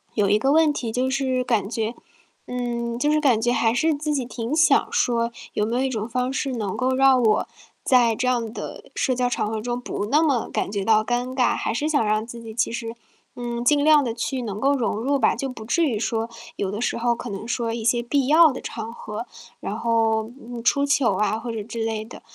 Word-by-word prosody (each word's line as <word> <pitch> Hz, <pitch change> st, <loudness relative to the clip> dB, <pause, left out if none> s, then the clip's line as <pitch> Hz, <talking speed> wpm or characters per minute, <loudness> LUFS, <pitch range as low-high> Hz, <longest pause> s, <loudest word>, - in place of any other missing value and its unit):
有 200 Hz, -3 st, +2 dB
一 210 Hz, -, +4 dB
个 270 Hz, +4 st, +2 dB
问 315 Hz, 0 st, +5 dB
题 235 Hz, -5 st, -3 dB
就 255 Hz, +3 st, 0 dB
是 260 Hz, -2 st, 0 dB
感 225 Hz, -5 st, 0 dB
觉 225 Hz, 0 st, -2 dB, 0.5 s
嗯， 235 Hz, -1 st, -3 dB
就 295 Hz, +3 st, +2 dB
是 305 Hz, -, +3 dB
感 255 Hz, -7 st, +3 dB
觉 240 Hz, +1 st, +2 dB
还 230 Hz, -2 st, +2 dB
是 315 Hz, +6 st, +2 dB
自 300 Hz, +1 st, -2 dB
己 270 Hz, -3 st, 0 dB
挺 240 Hz, +3 st, -4 dB
想 315 Hz, -3 st, +4 dB
说， 235 Hz, -1 st, +1 dB, 0.2 s
有 210 Hz, -, 0 dB
没 230 Hz, -, -2 dB
有 255 Hz, -, +1 dB
一 265 Hz, -, 0 dB
种 220 Hz, -3 st, -3 dB
方 250 Hz, +2 st, -1 dB
式 270 Hz, -1 st, -2 dB
能 210 Hz, -5 st, -3 dB
够 255 Hz, +1 st, +1 dB
让 265 Hz, -1 st, +5 dB
我 215 Hz, -2 st, +2 dB, 0.4 s
在 240 Hz, -3 st, +4 dB
这 255 Hz, +2 st, -1 dB
样 235 Hz, -3 st, 0 dB
的 -, -, -7 dB
社 255 Hz, -2 st, +1 dB
交 250 Hz, 0 st, +1 dB
场 225 Hz, -, -1 dB
合 220 Hz, 0 st, -3 dB
中 240 Hz, +2 st, -3 dB
不 205 Hz, -, -3 dB
那 290 Hz, +7 st, +3 dB
么 275 Hz, -7 st, +1 dB
感 -, -, -1 dB
觉 200 Hz, -2 st, -2 dB
到 215 Hz, 0 st, +4 dB
尴 245 Hz, +2 st, -2 dB
尬， 255 Hz, -2 st, +2 dB
还 -, -, -2 dB
是 295 Hz, +6 st, -1 dB
想 290 Hz, -6 st, +2 dB
让 215 Hz, +1 st, +1 dB
自 235 Hz, 0 st, -9 dB
己 225 Hz, -1 st, -8 dB
其 225 Hz, -, 0 dB
实， 230 Hz, 0 st, -5 dB, 0.4 s
嗯， 240 Hz, 0 st, -4 dB
尽 290 Hz, 0 st, +4 dB
量 305 Hz, -1 st, +6 dB
地 235 Hz, -, -2 dB
去 250 Hz, +2 st, -3 dB
能 210 Hz, -2 st, -5 dB
够 280 Hz, +1 st, +3 dB
融 240 Hz, -5 st, -1 dB
入 275 Hz, +5 st, +1 dB
吧。 225 Hz, -, +3 dB
就 270 Hz, +3 st, -3 dB
不 225 Hz, -4 st, -9 dB
至 335 Hz, +8 st, +2 dB
于 245 Hz, -8 st, 0 dB
说， 225 Hz, 0 st, -1 dB, 0.3 s
有 195 Hz, -, -2 dB
的 210 Hz, -, -4 dB
时 -, -, 0 dB
候 235 Hz, 0 st, +1 dB
可 240 Hz, 0 st, -7 dB
能 200 Hz, +3 st, -6 dB
说 235 Hz, -1 st, -1 dB
一 230 Hz, -, -4 dB
些 235 Hz, +1 st, +2 dB
必 265 Hz, +2 st, 0 dB
要 315 Hz, +1 st, +7 dB
的 255 Hz, -, -7 dB
场 225 Hz, 0 st, -6 dB
合， 220 Hz, 0 st, -6 dB, 0.3 s
然 210 Hz, -, -4 dB
后， 225 Hz, -1 st, +1 dB
嗯， 240 Hz, -2 st, -8 dB
出 280 Hz, +3 st, +3 dB
糗 275 Hz, -8 st, +2 dB
啊， 210 Hz, +2 st, 0 dB
或 235 Hz, 0 st, -5 dB
者 220 Hz, -2 st, -4 dB
之 225 Hz, +1 st, -4 dB
类 220 Hz, -1 st, -2 dB
的。 230 Hz, -, -12 dB
240 Hz, 260 characters per minute, -23 LUFS, 225-260 Hz, 0.5 s, 要